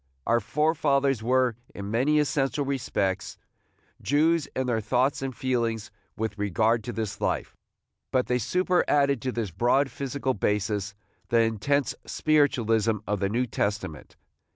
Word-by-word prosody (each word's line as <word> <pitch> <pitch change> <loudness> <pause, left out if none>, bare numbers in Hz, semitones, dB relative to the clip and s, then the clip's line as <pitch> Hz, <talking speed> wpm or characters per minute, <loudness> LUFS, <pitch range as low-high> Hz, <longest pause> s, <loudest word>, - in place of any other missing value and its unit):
Our 120 +1 +3
fore 150 +8 +1
fathers 140 -5 +1
were, 125 0 +2 0.2
in 100 0 -5
many 135 +7 +2
essential 145 -1 +1
respects, 120 -8 -2 0.6
Jews 155 +2 +2
in 130 - 0
their 115 -3 0
thoughts 125 +6 +1
and 135 -2 -4
feelings 115 -5 -1 0.3
with 110 -2 -3
regard 110 +3 +1
to 120 - -3
this 110 -3 -4
life, - - -1 0.6
but 130 -1 +2
they 125 0 0
superadded 145 - +2
to 130 - -2
this 115 -6 -3
broad 125 - +2
physical 135 -1 -2
basis 105 -1 -1 0.3
the 115 -1 +4
intense 120 +6 +1
spiritualism 115 -8 +2
of 105 -1 -1
the 100 0 0
New 120 +4 +1
Testament. 100 -8 -3
125 Hz, 140 wpm, -26 LUFS, 110-140 Hz, 0.6 s, the